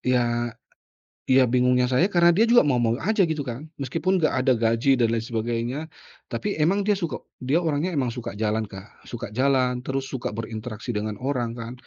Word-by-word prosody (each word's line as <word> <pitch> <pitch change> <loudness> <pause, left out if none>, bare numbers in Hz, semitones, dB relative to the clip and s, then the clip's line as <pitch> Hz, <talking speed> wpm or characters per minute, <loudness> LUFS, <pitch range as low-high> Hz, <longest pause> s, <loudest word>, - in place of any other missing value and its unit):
ya 120 -1 +1 0.8
ya 130 -1 +4
bingungnya 125 +1 +3
saya 165 +11 +2
karena 175 -1 +5
dia 220 - +4
juga 240 -11 +6
mau-mau 120 -2 +1
aja 215 -2 +2
gitu 155 -5 -2
kan, 140 +7 -6
meskipun 165 +8 0
enggak 155 - +2
ada 130 - +3
gaji 120 +3 +2
dan 115 - +4
lain 115 - -2
sebagainya, 115 +3 -2 0.5
tapi 205 -6 -3
emang 195 +6 +2
dia 205 -1 +1
suka 165 -7 -4 0.2
dia 145 +7 +1
orangnya 160 +3 -1
emang 130 -4 0
suka 115 -4 -6
jalan 110 0 -1
Kak, 95 +1 -13
suka 120 -3 -6
jalan, 130 0 +1
terus 135 0 -1
suka 120 -5 -4
berinteraksi 110 +1 -5
dengan 105 0 -3
orang 120 -4 -1
kan. 115 +1 -6
125 Hz, 180 wpm, -24 LUFS, 115-150 Hz, 0.8 s, juga